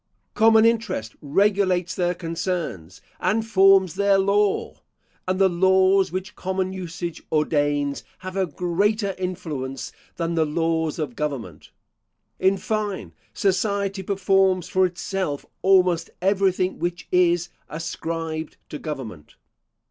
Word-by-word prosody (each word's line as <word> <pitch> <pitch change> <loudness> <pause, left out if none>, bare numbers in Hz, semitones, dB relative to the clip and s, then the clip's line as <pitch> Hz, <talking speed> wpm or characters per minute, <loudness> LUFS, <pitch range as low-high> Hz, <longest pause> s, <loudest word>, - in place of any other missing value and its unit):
Common 225 0 +5
interest 225 - 0
regulates 185 +2 +2
their 180 0 0
concerns, 165 - -4 0.2
and 220 +1 +1
forms 195 -4 +5
their 200 +1 +3
law; 200 +1 +1 0.5
and 185 0 0
the 195 0 +5
laws 190 +1 +3
which 185 +1 -5
common 190 0 -2
usage 175 -2 -5
ordains, 145 -2 +1 0.2
have 185 0 -5
a 190 -1 +1
greater 195 +5 0
influence 150 -8 -4 0.2
than 170 0 -2
the 165 -1 +2
laws 160 0 0
of 145 -7 -4
government. 130 - -5 0.7
In 190 +1 +3
fine, 210 0 -3 0.2
society 200 0 0
performs 190 -2 +2
for 185 0 +3
itself 180 -4 -3 0.2
almost 180 -3 +3
everything 190 -1 +1
which 175 0 -3
is 175 -1 +3 0.2
ascribed 160 0 -4
to 150 - -6
government. 130 - -7
185 Hz, 115 wpm, -23 LUFS, 160-195 Hz, 0.7 s, Common